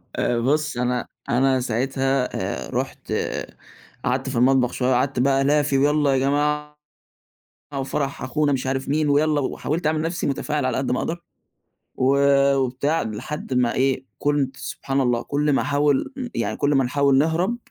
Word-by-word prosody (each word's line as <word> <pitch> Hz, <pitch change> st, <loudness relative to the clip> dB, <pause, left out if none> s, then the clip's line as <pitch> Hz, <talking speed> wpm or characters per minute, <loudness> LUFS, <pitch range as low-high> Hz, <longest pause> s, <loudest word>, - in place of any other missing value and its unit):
آآ، 120 Hz, -1 st, 0 dB
بُص 150 Hz, +3 st, 0 dB
أنا 125 Hz, 0 st, -1 dB, 0.2 s
أنا 130 Hz, +2 st, +3 dB
ساعتها 130 Hz, +2 st, 0 dB, 0.4 s
آآ، -, -, -11 dB
رُحت -, -, -4 dB, 0.9 s
قعدت 130 Hz, +2 st, 0 dB
في 135 Hz, -, -4 dB
المطبخ 125 Hz, +1 st, +3 dB
شوية، 130 Hz, 0 st, 0 dB
قعدت 125 Hz, +1 st, 0 dB
بقى 135 Hz, +1 st, +3 dB
ألافي 145 Hz, 0 st, +2 dB
ويالّا 145 Hz, 0 st, +3 dB
يا -, -, +2 dB
جماعة 150 Hz, +2 st, 0 dB, 1.0 s
وفرح 140 Hz, +1 st, -3 dB
أخونا 145 Hz, +3 st, 0 dB
مش 130 Hz, 0 st, -2 dB
عارف 135 Hz, 0 st, -2 dB
مين 150 Hz, +1 st, +1 dB
ويالّا، 150 Hz, +1 st, +3 dB
وحاولت 155 Hz, +4 st, -2 dB
أعمل 155 Hz, 0 st, +1 dB
نَفْسي 165 Hz, +2 st, -2 dB
متفاعل 145 Hz, 0 st, -1 dB
على 130 Hz, -, 0 dB
قد 130 Hz, -2 st, -1 dB
ما 125 Hz, -, 0 dB
أقدَر، 170 Hz, +1 st, -3 dB, 0.7 s
و 135 Hz, +2 st, +2 dB, 0.4 s
وبتاع، 135 Hz, +4 st, 0 dB
لحد 115 Hz, +6 st, -5 dB
ما 125 Hz, -2 st, +2 dB
إيه 130 Hz, 0 st, 0 dB
كنت 145 Hz, -2 st, 0 dB
سبحان 135 Hz, 0 st, -2 dB
الله 120 Hz, -2 st, +1 dB
كُلّ 145 Hz, +1 st, 0 dB
ما -, -, +2 dB
أحاول 145 Hz, -, +1 dB
م 255 Hz, -2 st, -3 dB
يعني -, -, -1 dB
كُلّ 145 Hz, 0 st, +1 dB
ما 135 Hz, -, +4 dB
نحاول 140 Hz, +2 st, +2 dB
نهرَب 165 Hz, -, +1 dB
135 Hz, 165 wpm, -23 LUFS, 130-150 Hz, 1.0 s, ما